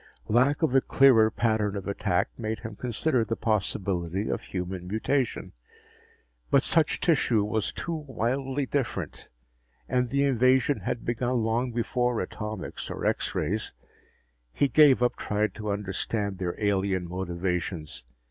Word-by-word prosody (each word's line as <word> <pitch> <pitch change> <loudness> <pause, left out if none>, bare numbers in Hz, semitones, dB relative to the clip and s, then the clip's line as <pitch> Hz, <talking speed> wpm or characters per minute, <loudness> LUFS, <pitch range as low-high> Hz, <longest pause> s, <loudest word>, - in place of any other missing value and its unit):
Lack 130 +8 +3
of 155 - +2
a 135 - +5
clearer 125 -6 +5
pattern 110 -3 0
of 100 -1 -5
attack 100 -2 0
made 110 -1 -4
him 115 -3 -7
consider 125 +3 0
the 115 - -2
possibility 95 -4 -1
of - - -1
human 90 -1 -5
mutation, 115 +6 -1 1.0
but 135 - +4
such 160 -2 +2
tissue 130 - +2
was 105 0 -1
too 170 - -4
wildly 135 -1 -2
different, 135 -2 -3 0.6
and 125 -1 +1
the 140 +2 +1
invasion 130 +1 +3
had 120 - -4
begun 120 0 0
long 120 +3 0
before 120 0 0
atomics 105 +3 -5
or - - -5
X - - 0
rays. 110 +3 -2 0.8
He 140 - +2
gave 140 -2 +6
up 125 - +1
trying 105 +1 0
to 105 -1 -6
understand 100 0 -2
their 90 -2 -2
alien 95 -3 0
motivations. 90 -4 -3
110 Hz, 140 wpm, -27 LUFS, 100-130 Hz, 1.0 s, gave